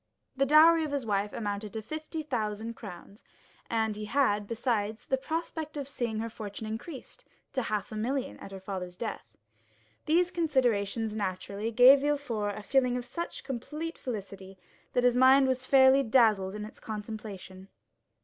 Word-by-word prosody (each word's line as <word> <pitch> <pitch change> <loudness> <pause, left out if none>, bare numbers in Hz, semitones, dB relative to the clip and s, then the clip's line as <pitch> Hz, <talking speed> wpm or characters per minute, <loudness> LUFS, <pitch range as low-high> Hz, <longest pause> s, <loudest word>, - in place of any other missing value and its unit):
The 275 0 +2
dowry 320 +3 +7
of 305 - -2
his 280 -3 -2
wife 205 -1 0
amounted 205 -1 -4
to 220 - -4
fifty 310 +5 -5
thousand 225 -4 -3
crowns, 200 -1 -11 0.5
and 220 -2 0
he 210 0 -5
had, 210 -5 +1
besides, 220 -2 -1
the 265 - +1
prospect 315 +2 -4
of 280 -2 -4
seeing 235 -5 -3
her 225 +1 -2
fortune 215 0 -7
increased 240 +6 -7 0.3
to 260 - 0
half 215 -3 -3
a - - -6
million 255 +5 -2
at 195 - -10
her 195 - -7
father's 185 -2 -6
death. 120 - -6 0.7
These 350 +3 +3
considerations 230 - 0
naturally 200 +1 -3
gave 250 +4 +8
Villefort 250 -8 -1
a 210 - -7
feeling 250 +1 +2
of 245 - -5
such 340 +5 -5
complete 300 +6 -5
felicity 195 -5 -7 0.4
that 245 - +2
his 245 -1 +4
mind 265 +2 +6
was 255 0 -1
fairly 265 0 +6
dazzled 220 -6 +3
in 210 0 -5
its 215 - -12
contemplation. 210 -3 -7
230 Hz, 160 wpm, -29 LUFS, 205-270 Hz, 0.7 s, gave